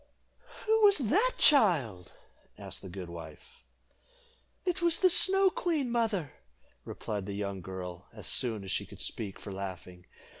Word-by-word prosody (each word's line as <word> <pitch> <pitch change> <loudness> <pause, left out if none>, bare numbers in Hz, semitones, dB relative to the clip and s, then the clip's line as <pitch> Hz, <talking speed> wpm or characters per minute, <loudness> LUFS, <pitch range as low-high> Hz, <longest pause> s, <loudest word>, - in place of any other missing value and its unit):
"Who 440 0 +3
was 405 -2 +7
she, 275 - +2 0.2
child?" 150 - +3 0.5
asked - - -9
the 95 - -9
good 90 0 -7
wife. 85 - -12 1.0
"It 360 0 -1
was 340 -1 +3
the 370 -1 +4
Snow 385 +2 +6
Queen, 305 -10 -1
mother," 220 - -1 0.5
replied 105 -2 -5
the 100 - -5
young 100 -2 -4
girl, 90 -1 -8
as - - -11
soon 110 -5 0
as 95 - -6
she - - -2
could - - -13
speak 100 -4 -4
for 100 - -9
laughing. 90 -2 -8
115 Hz, 150 wpm, -30 LUFS, -, 1.0 s, was